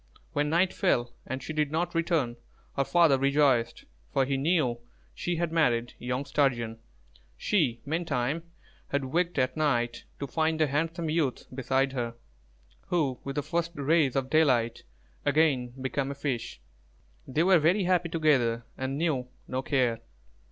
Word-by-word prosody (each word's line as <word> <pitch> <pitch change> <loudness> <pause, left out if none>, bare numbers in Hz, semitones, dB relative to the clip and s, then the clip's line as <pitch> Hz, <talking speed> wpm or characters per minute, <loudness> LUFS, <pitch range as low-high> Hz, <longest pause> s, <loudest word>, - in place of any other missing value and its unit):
When 145 0 +1
night 175 +4 +2
fell, 120 -11 +1
and 130 +2 -4
she 160 - -5
did 150 -2 +1
not 170 +2 -1
return, 165 -8 0 0.4
her 140 - +2
father 160 -3 +4
rejoiced, 135 -3 +2 0.3
for 135 -1 +2
he 135 +1 0
knew 135 -4 +1 0.3
she 175 - -2
had 170 -1 -1
married 120 -8 +1
young 125 +3 -2
Sturgeon. 120 -6 0 0.6
She, 135 - +1
meantime, 150 -2 -1 0.5
had 140 -1 -1
waked 170 +5 0
at 130 -1 +1
night 120 -6 0
to 140 - -2
find 160 +4 0
a 155 - +5
handsome 160 +3 -1
youth 155 -6 0
beside 135 +1 0
her, 120 -3 -3 0.7
who, 140 -8 0
with 140 0 -5
the 145 - -1
first 170 +3 -2
rays 145 -1 +2
of 135 -1 -1
daylight, 130 -7 +3 0.4
again 145 -4 +2
became 135 +1 -2
a 140 - -4
fish. 125 - -3 0.7
They 150 +5 +1
were 185 -1 +6
very 175 +6 +3
happy 180 -1 +2
together 130 -8 +2
and 130 +1 -3
knew 145 -6 0 0.2
no 130 +1 -2
care. 125 -5 +1
140 Hz, 150 wpm, -28 LUFS, 130-160 Hz, 0.7 s, were